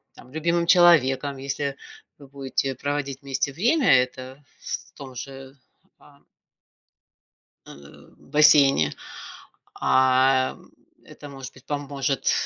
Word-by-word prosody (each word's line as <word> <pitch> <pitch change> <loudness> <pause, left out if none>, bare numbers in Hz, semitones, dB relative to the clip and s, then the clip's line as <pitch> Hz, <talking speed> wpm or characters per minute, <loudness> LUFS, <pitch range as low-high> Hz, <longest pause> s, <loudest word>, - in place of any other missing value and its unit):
там 125 - -16
любимым 170 +2 -1
человеком. 145 -6 +4
Если 140 +1 -4 0.4
вы 140 - -14
будете 135 -1 -3
проводить 140 0 -4
вместе 140 +1 -2
время, 245 - +2
это 130 +2 -11 0.2
в - - -7
том 135 -3 -11
же, 135 +2 -10 0.4
а - - -21 1.5
Э, - - -11 0.5
в - - -22
бассейне. 145 - +4 0.8
А, 130 0 +2
м, - - -19 0.3
это, 145 - -13
может 135 -2 -10
быть, 130 - -18
поможет, 140 -2 -2
140 Hz, 110 wpm, -23 LUFS, 130-145 Hz, 1.5 s, человеком